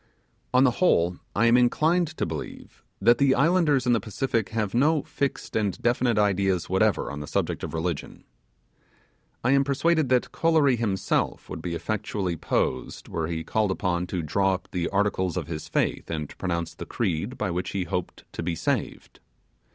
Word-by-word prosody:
On 125 +1 +5
the 130 - +5
whole, 90 - +3 0.2
I 110 - +3
am 115 +1 +5
inclined 155 +8 +3
to - - 0
believe, - - -7 0.2
that 120 0 +4
the 135 -1 +4
islanders 150 -3 +3
in 125 - +3
the 115 - +3
Pacific 115 -1 -2
have 110 -3 -2
no 150 +5 +3
fixed 140 -1 -3
and 105 -4 0
definite 120 -1 +1
ideas 95 -3 +2
whatever 95 -3 +1
on 70 - -6
the 75 - -6
subject - - -2
of - - -4
religion. 80 -1 -4 1.2
I 125 - +3
am 140 0 +5
persuaded 145 +1 +1
that 125 -1 +2
Kolory 160 -5 +3
himself 105 -5 -1
would 80 - -5
be 85 0 -3
effectually 100 0 -2
posed - - -2
were 80 -1 -2
he 80 -1 -3
called 105 +5 0
upon 90 -2 -1
to 90 -2 -3
draw 95 +5 +1
up 95 - -9
the 90 -3 -1
articles 100 -3 0
of - - -2
his 80 -2 -6
faith - - -1
and 75 -3 -4
pronounce 85 -2 -2
the - - -8
creed 100 +2 -2
by 95 - -1
which 90 +2 -2
he 95 -2 -2
hoped 90 0 -4
to - - -4
be 85 0 -2
saved. - - -3
100 Hz, 180 wpm, -26 LUFS, 90-125 Hz, 1.2 s, On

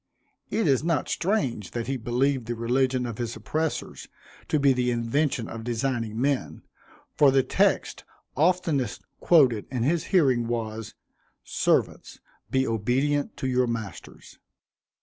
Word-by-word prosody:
It 220 -4 0
is 135 -1 +3
not 165 -2 0
strange 165 - -1
that 115 - -2
he 135 - -2
believed 125 +1 0
the 120 - -2
religion 125 +2 0
of 115 -2 -6
his 120 -1 -3
oppressors 155 +8 -3 0.4
to 155 - +1
be 140 -1 +4
the 125 -1 0
invention 120 +1 0
of 115 -1 -7
designing 115 -2 -2
men, 140 0 -1 0.5
for 145 -2 +5
the 135 0 +3
text 130 - +1 0.3
oftenest 160 -6 +1 0.2
quoted 130 -11 +4
in 125 -3 -2
his 160 +5 +1
hearing 130 -10 +2
was, 115 -2 -4 0.5
"Servants, - - 0 0.3
be 130 0 +1
obedient 130 +6 0
to 130 - -3
your 125 -1 +2
masters." 115 -4 -7
130 Hz, 135 wpm, -26 LUFS, 115-145 Hz, 0.5 s, for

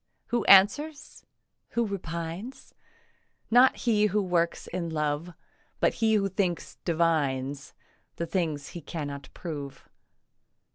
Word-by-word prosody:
Who 240 -2 +1
answers, 280 +11 +4 0.4
who 235 0 0
repines? 175 +4 -6 0.8
Not 250 +3 +6
he 210 -3 +2
who 210 +1 +1
works 175 -3 0
in 170 -2 -4
love, 155 +2 -2 0.4
But - - +3
he 220 -1 +4
who 200 -2 +2
thinks 185 -3 -2
divines 145 -5 0 0.4
The 170 - -3
thing 165 -3 -1
he 145 +4 -9
cannot 145 -3 -6
prove. 145 -5 -7
170 Hz, 110 wpm, -28 LUFS, 155-205 Hz, 0.8 s, Not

